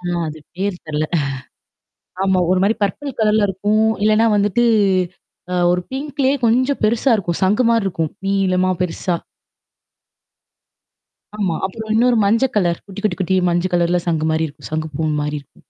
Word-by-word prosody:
ஆ - - -18 0.2
அது 155 - -8 0.2
பேர் 195 0 -2
தெரில. 155 0 -1 1.2
ஆமா. 190 -1 +2
ஒரு 185 - +3
மாரி 210 +3 +2
பர்பல் 270 +7 -3
கலர்ல 215 -1 +3
இருக்கும். 205 +3 +1 0.2
இல்லன்னா 215 +1 +4
வந்துட்டு 205 +3 +2 0.9
அ - - -1 0.2
ஒரு 180 0 +1
பிங்க்லயே 275 0 -1
கொஞ்சம் 255 +5 +2
பெருசா 235 +5 +2
இருக்கும். 175 -5 -2
சங்கு 210 +6 +3
மாரி 230 -3 +2
இருக்கும். 165 -4 -2
நீீலமா 185 -2 +1
பெருசா. 180 0 -1 2.2
ஆமா. 185 -6 0
அப்புறம் 220 +3 -6
இன்னொரு 240 +2 +3
மஞ்ச 225 +5 +3
கலர், 175 -4 +1
குட்டி 200 0 -8
குட்டி 190 -3 0
குட்டி, 185 +1 +1
மஞ்ச 175 +1 0
கலர்ல 175 0 +2
சங்கு 160 -2 0
மாரி 160 0 0
இருக்கும். 145 - -12
சங்கு 155 0 -2
பூ 160 -1 -1
மாரி 150 0 -2
இருக்கும். 140 - -24
195 Hz, 155 wpm, -19 LUFS, 175-220 Hz, 2.2 s, இல்லன்னா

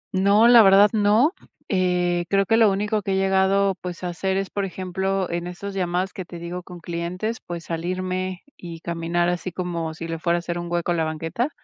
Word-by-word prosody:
No, 200 +4 +5
la 240 -1 +9
verdad, 200 +1 +6
no. 220 - +3 0.4
Eh, 180 -2 +1
creo 195 0 +3
que 225 - +3
lo 225 -2 +5
único 210 +2 0
que 195 -1 -2
he - - +1
llegado, 195 +1 +2
pues, 180 0 -7
a 180 - -1
hacer 190 +2 -1
es, 195 -1 -3
por 200 - -2
ejemplo, 190 0 -2
en 175 +1 -3
esas 195 +3 -6
llamadas 185 0 -1
que 190 - -5
te 175 0 -10
digo, 175 +1 -6
con 180 -1 -11
clientes, 180 +7 -4
pues, 170 -1 -6
salirme 185 +2 -3
y 170 -2 -9
caminar 170 0 -1
así 180 +1 -3
como 170 -2 -3
si 165 0 -6
le 165 -1 -4
fuera 170 +1 +1
a - - -1
hacer 175 0 -4
un 175 0 -6
hueco 175 0 0
a - - +1
la 165 - +1
banqueta. 165 - -2
185 Hz, 215 wpm, -23 LUFS, 175-195 Hz, 0.4 s, la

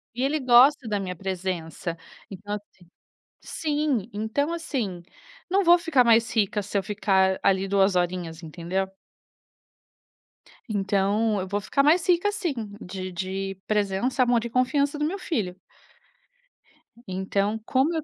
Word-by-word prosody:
e 250 - -1
ele 295 +3 +1
gosta 255 +1 +5
da 210 -1 0
minha 180 -1 -4
presença, 180 -3 -4 0.4
então, 205 +2 -5
assim 205 -3 -13 0.7
Sim, 295 -8 -1
então, 230 +10 -1
assim, 235 - -3 0.5
não 390 +2 +3
vou 345 +1 +7
ficar 330 -7 +3
mais 230 0 +4
rica 210 -1 +1
se 205 +1 -2
eu - - -1
ficar, 190 -2 +1
ali, 195 0 +2
2 195 0 +3
horinhas, 175 -2 -2
entendeu? 175 +4 -3 1.8
Então, 205 +1 +1
eu 190 - -4
vou 205 +2 -2
ficar 275 +7 +1
mais 320 +4 +4
rica 360 +3 +3
sim, 390 -7 -2 0.3
de 185 0 -6
de 190 +2 -4
presença, 210 +5 +1
amor 240 -2 +2
e - - -4
confiança 280 +4 +1
do 300 - 0
meu 380 +6 -3
filho. 215 - -2 1.5
Então, 195 +3 -1
como 270 +7 +2
eu. 320 - -2
210 Hz, 140 wpm, -25 LUFS, 190-275 Hz, 1.8 s, vou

